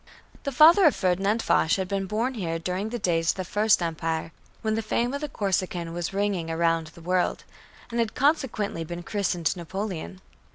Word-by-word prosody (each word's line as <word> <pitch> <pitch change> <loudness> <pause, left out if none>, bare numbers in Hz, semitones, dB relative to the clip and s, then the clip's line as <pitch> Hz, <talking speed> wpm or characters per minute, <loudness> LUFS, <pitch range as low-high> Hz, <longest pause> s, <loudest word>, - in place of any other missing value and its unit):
The 280 - -1
father 330 +8 +7
of 300 - +5
Ferdinand 195 +4 +1
Foch 160 - +3
had 190 -1 -2
been 195 0 -2
born 230 +6 -1
here 170 -8 -2
during 185 +5 -3
the 240 - -3
days 165 -5 +1
of - - +2
the 185 - -4
First 210 0 +3
Empire, 165 0 -2 0.3
when 220 -1 +1
the 225 - 0
fame 235 +3 -1
of 280 - -3
the 300 - -3
Corsican 185 -6 -2
was 175 0 -3
ringing 195 -4 -1
around 165 0 +1
the 170 +2 -14
world 180 +1 0 0.5
and 235 - -2
had 230 -2 0
consequently 260 - 0
been 175 +2 -6
christened 180 -4 -1
Napoleon. 175 - -5
190 Hz, 190 wpm, -26 LUFS, 170-220 Hz, 0.5 s, father